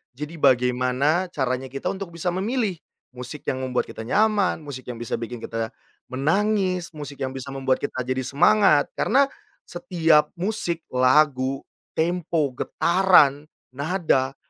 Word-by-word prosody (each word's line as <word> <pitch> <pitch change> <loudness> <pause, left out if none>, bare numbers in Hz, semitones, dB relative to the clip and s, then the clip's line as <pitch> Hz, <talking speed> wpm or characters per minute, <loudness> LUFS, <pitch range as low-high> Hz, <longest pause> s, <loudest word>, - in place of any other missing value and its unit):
Jadi 150 +4 -7
bagaimana 130 +6 +2
caranya 130 -2 -2
kita 135 - -4
untuk 195 -2 -6
bisa 170 +1 -6
memilih, 210 +2 -1 0.4
musik 125 +4 -9
yang 130 0 -1
membuat 125 -1 -1
kita 110 - -8
nyaman, 205 - +2
musik 140 -4 -8
yang 115 - -9
bisa 120 - -3
bikin 120 0 -6
kita 115 0 -4 0.4
menangis, 185 +5 0
musik 145 -3 -7
yang 130 - -2
bisa 135 0 -7
membuat 135 -1 0
kita 130 -3 -3
jadi 130 +1 -2
semangat. 155 +2 +4
Karena, 275 +4 +3 0.4
setiap 165 -9 +2
musik, 175 -3 -3
lagu, 130 +1 +2 0.3
tempo, 165 -3 0
getaran, 155 -2 +3 0.2
nada, 140 -2 0
145 Hz, 135 wpm, -24 LUFS, 130-180 Hz, 0.4 s, semangat